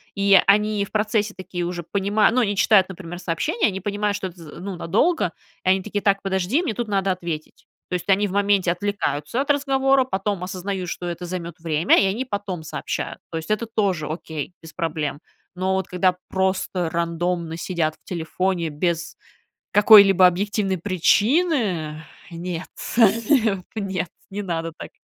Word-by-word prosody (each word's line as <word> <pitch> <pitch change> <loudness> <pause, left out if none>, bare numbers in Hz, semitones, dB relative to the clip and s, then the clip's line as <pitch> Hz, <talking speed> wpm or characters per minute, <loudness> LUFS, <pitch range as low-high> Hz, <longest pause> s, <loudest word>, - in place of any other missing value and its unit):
и 200 -1 +6
они 210 0 +3
в - - -18
процессе 215 0 0
такие 180 -2 -4
уже 175 0 -4
понимают, 200 +5 +2
ну, 255 - +3
они 205 -3 0
читают, 195 -2 +5
например, 175 -2 -8
сообщения, 185 - 0
они 190 -1 -3
понимают, 205 +1 -1
что 200 -2 -3
это 180 0 -13
з 155 -3 -11
ну 190 +1 -5
надолго, 225 - +1 0.3
и - - +3
они 190 +1 +4
такие: 205 0 -3
"Так, 200 -1 +2
подожди, 190 - +1
мне 310 - -1
тут 235 +2 -3
надо 195 -2 +1
ответить". 170 -4 -6 0.2
То - - -6
есть, 180 +2 -3
они 200 +2 +4
в - - -7
моменте 200 -2 +2
отвлекаются 200 - -2
от 280 - -5
разговора, 270 -1 +3
потом 195 -5 -2
осознают, 185 0 -4
что 175 - -5
это 175 +1 -5
займет 170 -2 -5
время, 160 0 +3
и - - +3
они 210 +7 -1
потом 200 -7 -4
сообщают. 155 - -4
То 165 - -3
есть, 160 - -7
это 215 +2 0
тоже 195 -8 -1
окей, 155 0 -5
без 165 -1 -12
проблем. 155 -3 -2 0.4
Но 185 +1 0
вот 190 -1 -1
когда 180 0 +1
просто 190 -2 0
рандомно 170 0 -2
сидят 165 -3 -1
в - - -39
телефоне, 175 0 -2
без 170 +2 -2 0.6
какой-либо 200 -3 +8
объективной 195 +2 0
причины, 200 - +1 0.3
нет, 170 +1 -5 0.6
не 220 -9 +3
нет, 190 -4 -2 0.2
не 205 +1 -4
надо 165 -3 -3
так. - - -9
190 Hz, 170 wpm, -23 LUFS, 170-205 Hz, 0.6 s, какой-либо